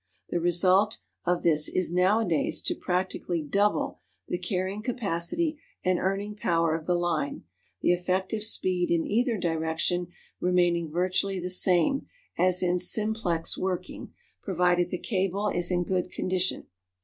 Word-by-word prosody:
The 175 - 0
result 185 +5 +3 0.3
of 180 0 0
this 155 -2 +3
is 180 -2 0
nowadays 180 -2 +2
to - - 0
practically 180 -2 -2
double 200 +8 0 0.3
the 175 - -2
carrying 185 +2 -2
capacity 245 - -1 0.3
and 185 -1 +2
earning 195 +2 -2
power 165 -5 +1
of 160 -1 -4
the 180 - +2
line, 170 -4 -1 0.4
the - - +3
effective 185 +4 -1
speed 185 -4 0
in 170 -1 +1
either 235 +2 +1
direction 165 +1 -1 0.3
remaining 175 -2 +1
virtually 185 +3 0
the 180 +1 -3
same 185 - +2 0.3
as 185 0 +4
in 180 0 +1
"simplex" 180 -3 +2
working, 185 -1 -4 0.3
provided 180 -2 +1
the 180 - -3
cable 195 +1 -1
is 175 -2 0
in 175 -1 +1
good 180 0 -1
condition. 185 0 -1
180 Hz, 135 wpm, -27 LUFS, 175-195 Hz, 0.4 s, as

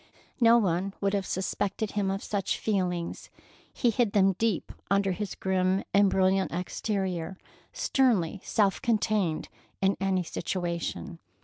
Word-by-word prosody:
No 235 -1 +7
one 195 -2 0
would 200 0 0
have 195 -2 -1
suspected 200 +2 -2
him 205 -2 0
of 195 +1 -2
such 200 -2 -1
feelings. 180 -5 -2 0.4
He 240 - +1
hid 225 -2 +1
them 195 -1 +4
deep 225 -5 0 0.2
under 195 0 +2
his 205 +2 -4
grim 190 0 +1
and 200 0 +5
brilliant 190 0 +2
exterior, 185 0 -2 0.3
sternly 205 - +1
self 200 -3 +1
contained 210 -7 +1 0.3
in 195 +1 +2
any 190 -2 +1
situation. 170 +1 -3
195 Hz, 130 wpm, -28 LUFS, 185-205 Hz, 0.4 s, No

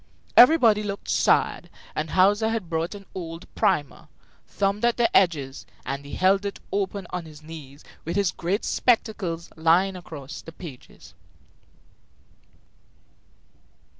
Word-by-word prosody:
Everybody 240 -6 +7
looked 200 -1 -5
sad; - - +2 0.3
and 155 +1 -2
Hauser 205 +5 +3
had 220 -7 -3
brought 165 +4 -1
an 200 -1 -11
old 165 -2 -7
primer, 145 -3 0 0.4
thumbed 200 +2 -1
at 240 0 +3
the 240 -1 +1
edges, 145 -8 +2 0.2
and 140 +2 -4
he 140 - -7
held 195 +2 +3
it 200 -1 -4
open 200 -1 -2
on 180 -2 -4
his 155 -1 -13
knees 155 -3 -11 0.2
with 170 +2 -4
his 200 -3 +2
great 190 +6 -2
spectacles 205 -8 0
lying 170 +4 +3
across 155 -5 -8
the 165 - -11
pages. 155 -8 -12
180 Hz, 130 wpm, -25 LUFS, 160-200 Hz, 0.4 s, Everybody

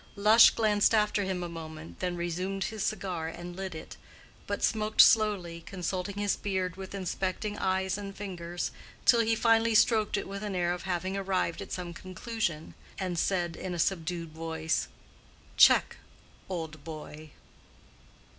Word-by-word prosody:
Lush 215 +3 +8
glanced 215 0 +3
after 210 -1 +2
him 185 -2 -2
a - - -3
moment, 160 -1 -9
then 180 -1 -2
resumed 180 +3 -2
his 220 +3 -4
cigar 185 -7 -2
and 175 +1 -7
lit 190 -2 -5
it, 160 - -9 0.5
but - - -3
smoked 215 -1 0
slowly, 195 -6 +4
consulting 185 0 -3
his 205 -1 +1
beard 185 -3 -2
with 190 +1 -8
inspecting 190 +2 -2
eyes 190 +1 0
and 200 -1 -7
fingers, 175 -3 -4 0.3
till 235 - +6
he 225 0 +3
finally 225 0 +3
stroked 215 -1 +4
it - - -4
with 195 0 -6
an 205 -2 -3
air 175 -1 +1
of 180 +1 -7
having 185 +2 -1
arrived 190 -3 -1
at - - -8
some 180 -2 -4
conclusion, 185 -3 -4 0.2
and 180 -3 -2
said 175 -3 0
in 180 -2 -5
a - - -4
subdued 170 -1 -1
voice, 160 0 -2 0.7
"Check, - - +6 0.5
old 160 -4 -5
boy!" 155 -1 -9
185 Hz, 155 wpm, -29 LUFS, 170-205 Hz, 0.7 s, Lush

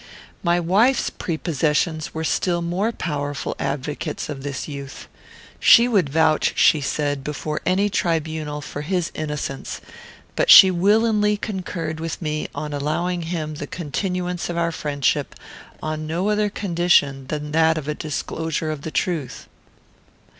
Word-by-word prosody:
My 175 -1 +2
wife's 205 +10 +2
prepossessions 160 -1 -1
were 160 - -4
still 170 +2 0
more 185 +7 0
powerful 145 -8 -3
advocates 145 +3 -3
of 140 -3 -5
this 140 -1 -4
youth. 140 -2 -8 0.5
She 235 -1 +7
would 195 - +2
vouch, 155 +1 +2
she 155 - +5
said, 145 -1 -1
before 150 +1 -4
any 195 +3 +3
tribunal, 160 -5 -2
for 145 0 -6
his 175 +2 -1
innocence; 150 -3 -4 0.6
but - - +1
she 190 - +11
willingly 210 +3 +3
concurred 180 -6 -4
with 165 0 -4
me 155 -2 -2
in 150 0 -4
allowing 170 +5 -1
him 160 -2 -3
the 145 -1 -6
continuance 180 +3 -3
of 175 - -3
our 170 0 +1
friendship 145 -4 -1 0.5
on 155 0 -3
no 175 +6 -1
other 210 0 +1
condition 170 -9 +1
than 150 0 -4
that 160 +1 +3
of 150 -2 -5
a 150 - 0
disclosure 155 +1 -3
of 150 -2 -5
the 160 - -5
truth. 155 -5 -3
160 Hz, 140 wpm, -22 LUFS, 150-180 Hz, 0.6 s, she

